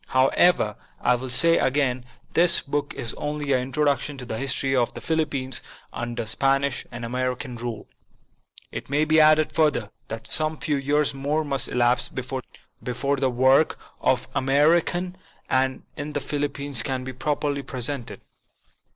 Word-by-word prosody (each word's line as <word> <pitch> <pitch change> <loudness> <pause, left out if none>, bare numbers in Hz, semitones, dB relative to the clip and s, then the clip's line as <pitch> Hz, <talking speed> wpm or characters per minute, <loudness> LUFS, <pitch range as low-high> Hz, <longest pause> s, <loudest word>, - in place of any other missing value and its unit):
However, 130 - +3 0.2
I 125 - +3
will 125 +1 -3
say 165 +7 +5
again, 130 -2 +1 0.3
this 170 0 +5
book 145 0 -2
is 115 - -2
only 145 -1 -1
an 130 - +2
introduction 145 +2 0
to 125 - -7
the 110 -2 -4
history 135 0 0
of 120 -2 +2
the - - -5
Philippines 145 -5 -1 0.3
under 120 0 -4
Spanish 135 +4 +1
and 120 -1 -6
American 125 +1 -3
rule. 115 -2 -6 0.8
It - - -6
may 145 +2 +2
be 155 +1 +4
added 155 0 +5
further, 145 -10 +1 0.2
that 115 0 -6
some 155 0 -1
few 145 -1 -1
years 145 +1 +1
more 145 +3 -1
must 135 -3 0
elapse 120 0 +2
before 130 +1 -4
the 135 -1 +2
work 130 +5 +4 0.2
of 125 -2 +1
America 160 +6 +2 0.4
in 130 0 +1
the 145 0 -3
Philippines 140 -3 -2
can 130 0 -2
be 130 0 -6
properly 145 +2 -1
presented. 130 -1 -4
135 Hz, 145 wpm, -24 LUFS, 125-145 Hz, 0.8 s, say